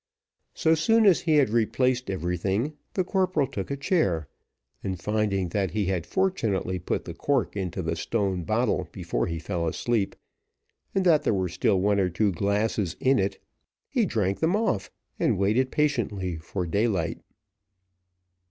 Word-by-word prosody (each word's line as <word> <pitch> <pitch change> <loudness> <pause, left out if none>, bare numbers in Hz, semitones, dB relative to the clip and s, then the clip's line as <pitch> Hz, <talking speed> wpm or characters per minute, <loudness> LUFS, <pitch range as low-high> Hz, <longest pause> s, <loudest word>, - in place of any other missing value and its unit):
So 160 -1 +3
soon 225 +8 +4
as 190 -4 +6
he 160 -2 +2
had 140 -7 +4
replaced 125 +2 +1
everything, 95 - -1 0.2
the 185 - +2
corporal 185 -5 +1
took 100 -8 -5
a 140 - -2
chair, 100 - +1 0.6
and 95 -2 -3
finding 100 -1 0
that 95 +1 0
he 105 +1 -1
had 90 -3 -1
fortunately 110 - 0
put 85 - -2
the - - -6
cork 140 -7 0
into 95 -2 -3
the 80 0 -1
stone 95 +1 -1
bottle - - 0
before - - -2
he 85 - -3
fell 85 +1 -2
asleep, 105 +4 -1 0.8
and 190 -1 +2
that 160 -4 +5
there - - +1
was 90 -3 -1
still 100 -3 +2
one 100 +1 +2
or 95 -2 +2
two 100 +4 +1
glasses 100 0 0
in 135 +1 +3
it, 95 +1 -1 0.5
he - - +1
drank 100 -3 0
them 165 +4 +2
off, 210 - 0 0.3
and - - +2
waited 110 +7 +2
patiently 105 - 0
for 90 +3 -4
daylight. 95 -2 0
100 Hz, 160 wpm, -26 LUFS, 90-135 Hz, 0.8 s, as